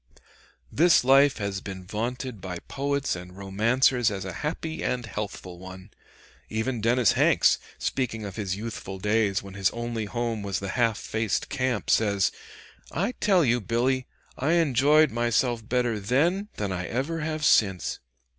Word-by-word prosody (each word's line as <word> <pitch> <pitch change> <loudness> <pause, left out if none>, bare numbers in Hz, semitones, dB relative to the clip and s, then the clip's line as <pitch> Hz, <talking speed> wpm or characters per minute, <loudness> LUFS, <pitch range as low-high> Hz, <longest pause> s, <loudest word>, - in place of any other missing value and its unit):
This 170 -1 +5
life 135 +2 +5
has 100 -2 -3
been 95 -2 -8
vaunted 115 +2 -4
by 90 -1 -5
poets 140 -2 -1
and 90 +1 -10
romancers 115 +5 +2
as 95 -2 -5
a 95 - -5
happy 160 +1 -3
and 125 -2 -1
healthful 100 -4 -6
one. 95 +2 -11 0.6
Even 110 +2 -2
Dennis 120 0 +3
Hanks, - - +4 0.2
speaking 115 -5 -2
of 100 -2 -7
his 95 -4 -2
youthful 105 -2 -6
days 105 0 +1
when 100 -1 -10
his 95 0 +1
only 120 -2 -4
home 115 +1 -2
was 100 -2 -2
the 100 - -5
half 115 0 +1
faced 110 -2 -2
camp, 130 -5 -1
says, 100 -3 +2 0.6
"I 195 - -1
tell 190 -6 +4
you, 120 -1 +2
Billy, 125 +4 0 0.3
I 145 +5 0
enjoyed 150 -1 +4
myself 120 0 0
better 120 -3 +1
then 165 - +1
than 100 -2 -3
I 90 -1 -3
ever 140 +7 -2
have 155 -1 -2
since." 95 - +2
115 Hz, 155 wpm, -26 LUFS, 100-130 Hz, 0.6 s, This